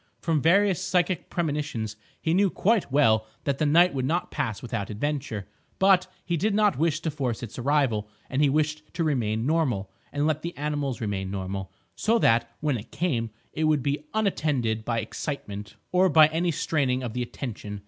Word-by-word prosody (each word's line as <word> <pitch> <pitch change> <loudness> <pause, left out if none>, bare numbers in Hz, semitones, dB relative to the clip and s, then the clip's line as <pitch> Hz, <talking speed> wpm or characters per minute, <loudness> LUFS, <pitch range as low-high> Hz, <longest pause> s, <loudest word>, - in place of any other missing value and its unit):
From 160 -3 +1
various 185 +3 +3
psychic 180 -2 0
premonitions 145 -10 -2 0.2
he 160 - 0
knew 195 +2 +4
quite 210 - +1
well 110 -6 +4 0.2
that 140 -1 -1
the 155 - +2
night 175 +4 +5
would 130 -2 -1
not 165 +7 -1
pass 110 -4 -2
without 105 -4 -4
adventure; 115 -2 -3 0.3
but 190 -1 +4 0.2
he 175 - 0
did 205 +5 +1
not 210 -7 +3
wish 160 0 +1
to 160 - -1
force 130 -6 -2
its 115 +1 -7
arrival; 125 -6 +1 0.2
and 135 - -1
he 145 - +5
wished 155 +1 +1
to 170 - 0
remain 115 -7 0
normal, 130 -11 0 0.2
and 145 +1 0
let 155 -1 +1
the 170 +2 -6
animals 145 -3 -2
remain 100 -3 -2
normal, 95 0 -4 0.2
so 230 +2 +2
that, 115 - +3
when 150 -4 +1
it 105 - -12
came, 125 -10 -1 0.2
it 160 - 0
would 155 -4 +2
be 145 +2 -2
unattended 145 - 0
by 115 0 0
excitement 105 -3 -5 0.2
or 185 +1 +4
by 155 -1 +8
any 165 +3 0
straining 140 -5 0
of 120 -3 -4
the 125 - -2
attention. 110 -4 -5
145 Hz, 185 wpm, -26 LUFS, 115-165 Hz, 0.3 s, by